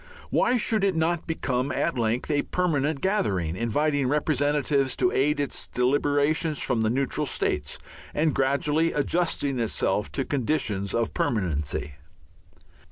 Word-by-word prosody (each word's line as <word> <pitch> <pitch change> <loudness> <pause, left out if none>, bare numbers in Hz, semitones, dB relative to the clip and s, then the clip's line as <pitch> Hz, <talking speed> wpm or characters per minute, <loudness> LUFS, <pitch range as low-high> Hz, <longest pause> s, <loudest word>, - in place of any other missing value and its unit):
Why 250 - +3
should 220 -2 +1
it 195 -3 +2
not 165 +1 0
become 135 -4 -1
at - - 0
length 120 +4 -1
a 145 -1 +2
permanent 155 -5 -1
gathering, 95 - 0
inviting 140 +6 0
representatives 145 -1 +1
to 185 - +2
aid 145 +2 +1
its 140 -2 -2
deliberations 145 +4 +1
from 125 -4 0
the 110 - +2
neutral 135 +3 -1
states, 75 -1 -1 0.3
and 155 0 +1
gradually 145 +4 +1
adjusting 145 -3 0
itself 105 -2 0
to 135 - -1
conditions 110 -8 -1
of 115 -1 0
permanency? 75 - -1
140 Hz, 130 wpm, -26 LUFS, 115-155 Hz, 0.3 s, Why